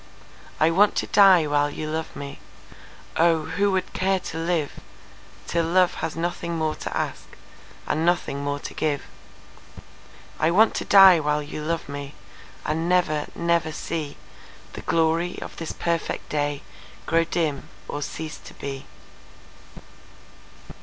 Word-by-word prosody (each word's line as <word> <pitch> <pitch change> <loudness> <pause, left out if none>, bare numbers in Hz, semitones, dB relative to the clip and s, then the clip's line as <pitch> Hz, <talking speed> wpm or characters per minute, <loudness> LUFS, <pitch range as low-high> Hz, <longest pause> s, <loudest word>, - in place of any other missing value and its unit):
I 155 +1 +4
want 200 +5 +4
to - - 0
die 190 -5 +6
while 145 0 +2
you 155 +1 -5
love 160 +1 -3
meOh, 160 +3 -3
who 200 0 +2
would 190 -1 -1
care 190 0 +1
to 160 - -7
liveTill 165 0 -4
love 180 0 +4
has 160 - -4
nothing 170 0 -3
more 155 -1 0
to - - -6
askAnd - - -6
nothing 160 -4 0
more 145 0 -1
to - - -7 1.7
give!I 160 - +3
want 215 +6 +5
to - - -3
die 195 -3 +8
while 150 0 0
you 150 +1 -6
love 165 +1 -2
meAnd 140 0 -7 0.6
never, 165 -2 +1
never 170 -1 +1
seeThe 155 -1 -8
glory 165 +2 +1
of - - -9
this 165 - -4
perfect 170 -1 -2
dayGrow 150 +3 -2
dim 155 -5 -1 0.2
or 145 - -4
cease 155 +1 -5
to - - -13
be. 135 -1 -6
160 Hz, 125 wpm, -24 LUFS, 150-175 Hz, 1.7 s, die